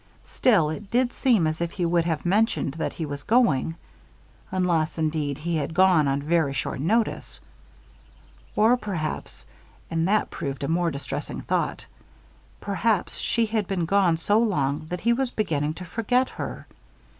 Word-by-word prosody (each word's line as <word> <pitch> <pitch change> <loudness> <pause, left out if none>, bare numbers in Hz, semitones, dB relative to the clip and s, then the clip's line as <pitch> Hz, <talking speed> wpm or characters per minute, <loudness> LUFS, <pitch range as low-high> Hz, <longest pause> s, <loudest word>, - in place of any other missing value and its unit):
Still, 185 -12 +2
it 195 +5 -7
did 245 +2 +1
seem 235 - +3
as 155 +1 -1
if 170 0 -2
he 180 - -1
would 170 0 +2
have 165 -1 -2
mentioned 200 - +1
that 160 - -3
he 160 - -4
was 145 -1 -6
going; 165 - +2 0.7
unless, 175 -4 0
indeed, 155 -3 -1
he 165 +2 -2
had 155 +1 -3
gone 180 -5 +5
on 140 +1 0
very 160 -3 +1
short 130 - -3
notice. 215 - 0 1.2
Or 225 +4 +4
perhaps 155 - -4 0.5
and 165 +1 +1
that 215 +2 +1
proved 140 0 -4
a - - -1
most 170 0 +1
distressing 140 - -5
thought - - -2 0.7
perhaps 200 0 0
she 230 -1 +1
had 215 -3 -1
been 185 -4 -1
gone 185 -2 +3
so 205 +6 +2
long 150 -9 0
that 180 0 -4
he 235 +1 +3
was 260 +1 0
beginning 155 -9 -1
to 180 - -8
forget 240 +7 +1
her. - - -6
170 Hz, 160 wpm, -25 LUFS, 155-210 Hz, 1.2 s, gone